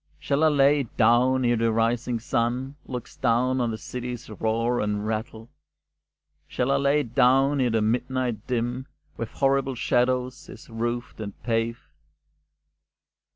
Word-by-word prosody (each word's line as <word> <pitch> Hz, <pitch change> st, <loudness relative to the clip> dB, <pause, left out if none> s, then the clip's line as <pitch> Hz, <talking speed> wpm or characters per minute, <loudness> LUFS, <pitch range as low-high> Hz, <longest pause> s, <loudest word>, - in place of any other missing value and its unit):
Shall 140 Hz, -, 0 dB
I -, -, +6 dB
lay 145 Hz, -1 st, +4 dB
it 130 Hz, -5 st, -6 dB
down 125 Hz, +3 st, +4 dB
e'er 120 Hz, 0 st, +3 dB
the 115 Hz, 0 st, +2 dB
rising 115 Hz, +1 st, 0 dB
sun 125 Hz, +3 st, -1 dB
Looks 125 Hz, -2 st, -7 dB
down 125 Hz, +1 st, +1 dB
on 120 Hz, -, 0 dB
the 110 Hz, -, -3 dB
city's 125 Hz, -1 st, -6 dB
roar 115 Hz, +3 st, 0 dB
and 105 Hz, 0 st, -1 dB
rattle? 110 Hz, +1 st, -4 dB, 1.0 s
Shall 125 Hz, +2 st, -1 dB
I 140 Hz, -, +3 dB
lay 140 Hz, +2 st, +2 dB
it 120 Hz, -5 st, -8 dB
down 135 Hz, +3 st, +4 dB
e'er 125 Hz, -, +2 dB
the 110 Hz, -1 st, +1 dB
midnight 120 Hz, 0 st, -1 dB
dim 125 Hz, +2 st, -2 dB, 0.3 s
With 115 Hz, -, -5 dB
horrible 135 Hz, -1 st, +1 dB
shadows 125 Hz, +1 st, 0 dB
is -, -, -12 dB
roofed 120 Hz, +1 st, -3 dB
and 100 Hz, -2 st, -7 dB
paved? 115 Hz, 0 st, -1 dB
120 Hz, 150 wpm, -25 LUFS, 115-130 Hz, 1.0 s, I